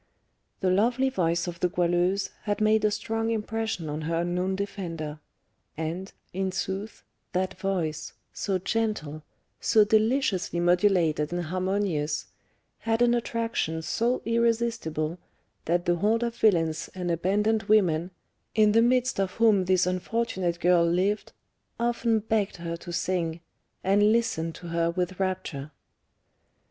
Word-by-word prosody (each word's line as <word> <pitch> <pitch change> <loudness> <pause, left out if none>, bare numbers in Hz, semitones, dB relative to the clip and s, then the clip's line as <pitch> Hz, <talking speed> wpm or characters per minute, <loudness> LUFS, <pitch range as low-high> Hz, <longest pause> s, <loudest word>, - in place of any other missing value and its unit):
The 185 -2 +2
lovely 240 +7 +2
voice 170 -6 0
of 175 -1 -6
the 180 - +1
Goualeuse 175 +3 +1
had 205 0 -1
made 215 0 +3
a 215 - +4
strong 225 +2 -2
impression 220 -5 -2
on 150 +1 -3
her 165 +2 -1
unknown 180 +2 -1
defender, 170 -6 -5 0.6
and, 165 +4 -4 0.2
in 190 +1 -1
sooth, 195 +3 -4 0.3
that 185 +1 -1
voice, 170 -6 -2 0.2
so 195 -2 -1
gentle, 185 -7 -2 0.4
so 215 -3 +4
deliciously 220 -4 +1
modulated 175 -4 +2
and 175 0 -2
harmonious, 185 -3 -1 0.5
had 225 +1 +1
an 240 0 +4
attraction 230 -9 -1
so 235 +10 0
irresistible 230 -9 0 0.5
that 175 +2 +1
the 175 -1 +2
horde 220 +6 +2
of 235 -1 -2
villains 165 -8 +2
and 180 -2 -2
abandoned 205 +6 +1
women, 180 -5 +3 0.5
in 215 -1 +5
the 225 +2 +5
midst 250 0 +2
of 190 -1 0
whom 215 -5 +4
this 185 -1 +3
unfortunate 185 -1 -1
girl 175 -1 +4
lived, 185 +5 0 0.5
often 235 -1 +1
begged 215 -2 0
her 170 -1 -4
to 170 +1 -9
sing, 170 -2 -1 0.4
and 205 +2 +4
listened 165 -8 0
to 175 - -9
her 170 0 +1
with 180 +1 -2
rapture. 180 -7 -3
190 Hz, 135 wpm, -27 LUFS, 170-220 Hz, 0.6 s, in